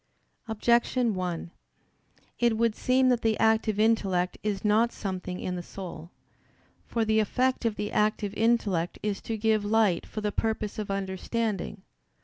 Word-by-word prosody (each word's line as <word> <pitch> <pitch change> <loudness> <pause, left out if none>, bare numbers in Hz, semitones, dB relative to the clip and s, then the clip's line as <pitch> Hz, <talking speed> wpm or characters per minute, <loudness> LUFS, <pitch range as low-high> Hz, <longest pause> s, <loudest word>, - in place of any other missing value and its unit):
Objection 235 +1 +2
1: 180 -2 -3 0.9
It 235 -2 +3
would 230 -1 +2
seem 255 0 +3
that 245 -2 +2
the 220 -1 +1
active 220 -1 +2
intellect 195 -5 +2
is 205 -1 -2
not 220 +3 +3
something 185 -2 -5
in 180 - -3
the 175 - -4
soul. 175 -3 -8 0.8
For 230 -1 0
the 220 0 +3
effect 255 +4 +1
of 225 -2 +1
the 205 - -3
active 210 -1 +1
intellect 210 -7 +1
is 205 -2 -2
to 225 - -3
give 215 -1 +2
light 205 -4 +2
for 215 - -5
the 210 0 -1
purpose 220 0 -2
of 210 - -4
understanding. 195 +1 -2
215 Hz, 150 wpm, -28 LUFS, 195-225 Hz, 0.9 s, It